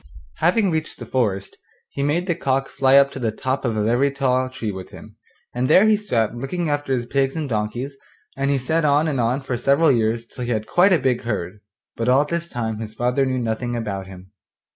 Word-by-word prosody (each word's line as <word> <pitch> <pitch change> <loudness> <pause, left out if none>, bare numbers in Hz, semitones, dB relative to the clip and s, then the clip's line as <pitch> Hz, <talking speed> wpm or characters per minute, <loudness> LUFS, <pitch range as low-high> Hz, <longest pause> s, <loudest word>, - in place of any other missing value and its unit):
Having 185 +4 +2
reached 160 -1 -2
the - - -8
forest 100 -7 -1 0.3
he - - -4
made 150 +5 +1
the 180 - +1
cock 135 -4 -1
fly 135 0 +3
up 140 0 +5
to 135 - -7
the 115 -3 0
top 130 +5 -2
of 115 -4 -1
a 105 - +1
very 120 +6 +2
tall 130 -2 0
tree 125 -4 -4
with 95 -1 -8
him, - - -13 0.4
and 125 +1 0
there 190 - +6
he 215 0 +5
sat 120 - -1
looking 150 +8 -3
after 145 -2 -2
his 125 -2 0
pigs 135 +2 0
and 155 -2 -2
donkeys, 120 +4 -3 0.4
and 140 +1 -1
he 140 - +2
sat 160 +6 0
on 150 +1 +3
and 140 -4 -1
on 120 +4 0
for 130 -2 -3
several 140 +6 +3
years 115 -1 0
till 125 - -8
he 120 - -4
had 110 -3 -1
quite 180 - +4
a 180 - +6
big 130 -4 0
herd; 105 -4 -4 0.4
but 115 +1 -1
all 135 +3 +4
this 170 +2 -3
time 110 -6 -3
his 110 -1 -7
father 125 +3 +1
knew 130 0 -1
nothing 120 0 -2
about 100 -5 -4
him. 95 0 -13
130 Hz, 230 wpm, -22 LUFS, 115-140 Hz, 0.4 s, there